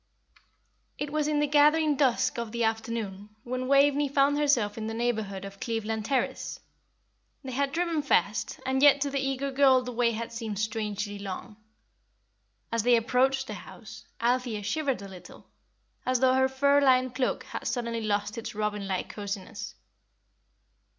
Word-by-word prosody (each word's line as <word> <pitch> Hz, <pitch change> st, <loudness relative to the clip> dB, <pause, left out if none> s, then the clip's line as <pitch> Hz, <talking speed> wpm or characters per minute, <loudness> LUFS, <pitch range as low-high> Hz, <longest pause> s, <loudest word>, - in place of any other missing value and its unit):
It 290 Hz, 0 st, -4 dB
was 305 Hz, -1 st, +1 dB
in 300 Hz, -1 st, +1 dB
the 295 Hz, -, +3 dB
gathering 300 Hz, +1 st, +4 dB
dusk 255 Hz, -3 st, +1 dB
of 230 Hz, -2 st, -4 dB
the 235 Hz, 0 st, -1 dB
afternoon 220 Hz, -2 st, -3 dB
when 255 Hz, +1 st, -3 dB
Waveney 280 Hz, +1 st, +4 dB
found 280 Hz, +1 st, +3 dB
herself 245 Hz, -9 st, +2 dB
in 220 Hz, -1 st, -4 dB
the 225 Hz, -, -4 dB
neighbourhood 220 Hz, -5 st, -2 dB
of 195 Hz, 0 st, -10 dB
Cleveland 220 Hz, -2 st, -3 dB
Terrace. 265 Hz, +1 st, -1 dB, 0.8 s
They 265 Hz, -, -6 dB
had 275 Hz, +2 st, 0 dB
driven 335 Hz, 0 st, 0 dB
fast, 230 Hz, -6 st, 0 dB
and 265 Hz, 0 st, 0 dB
yet 285 Hz, -1 st, +7 dB
to 285 Hz, 0 st, 0 dB
the 275 Hz, -, -1 dB
eager 270 Hz, +1 st, -2 dB
girl 265 Hz, -1 st, +5 dB
the 250 Hz, -, -5 dB
way 240 Hz, 0 st, +2 dB
had 230 Hz, +1 st, -5 dB
seemed 225 Hz, -3 st, -4 dB
strangely 210 Hz, -1 st, -3 dB
long. 200 Hz, +2 st, -7 dB, 1.2 s
As 230 Hz, 0 st, +1 dB
they 245 Hz, +2 st, +4 dB
approached 265 Hz, +3 st, +2 dB
the -, -, -6 dB
house, -, -, -11 dB
Althea 240 Hz, -3 st, 0 dB
shivered 270 Hz, 0 st, -1 dB
a -, -, -7 dB
little, 185 Hz, -2 st, -13 dB, 0.6 s
as 255 Hz, -1 st, +1 dB
though 260 Hz, 0 st, +4 dB
her 265 Hz, 0 st, +3 dB
fur 280 Hz, +2 st, +3 dB
lined 255 Hz, -2 st, +3 dB
cloak 255 Hz, 0 st, -1 dB
had -, -, -6 dB
suddenly 235 Hz, -2 st, -2 dB
lost 210 Hz, +1 st, -1 dB
its 230 Hz, 0 st, -7 dB
robin 210 Hz, -1 st, -2 dB
like 190 Hz, -1 st, -2 dB
cosiness. 205 Hz, +1 st, -6 dB
245 Hz, 165 wpm, -28 LUFS, 215-275 Hz, 1.2 s, yet